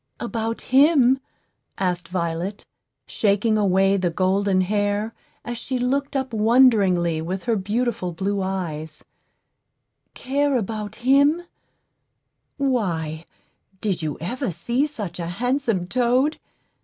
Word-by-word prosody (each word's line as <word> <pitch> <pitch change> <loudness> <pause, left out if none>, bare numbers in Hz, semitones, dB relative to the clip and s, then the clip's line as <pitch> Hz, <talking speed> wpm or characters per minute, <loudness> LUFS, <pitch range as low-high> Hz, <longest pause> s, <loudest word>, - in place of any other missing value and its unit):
"About 230 -1 -3
him?" 270 -1 +4 0.6
asked 180 -2 -1
Violet, 175 +2 -3 0.4
shaking 210 +1 +1
away 195 -1 +3
the 180 -2 0
golden 190 +2 +1
hair 205 +3 0 0.3
as 240 -1 -4
she 260 - -3
looked 275 +3 -1
up 265 -3 -2
wonderingly 210 -8 +4
with 185 +4 -4
her 235 -2 +1
beautiful 210 -1 -1
blue 195 +4 -2
eyes, 165 -5 -4 1.1
"care 280 +1 0
about 215 -1 -4
him? 285 +6 +4 1.1
Why, 170 - -1 0.5
did 195 -4 -1
you 155 -2 -3
ever 245 - -3
see 235 - 0
such 210 - -6
a 170 - -3
handsome 235 0 -1
toad? 250 - +1
210 Hz, 110 wpm, -23 LUFS, 180-250 Hz, 1.1 s, him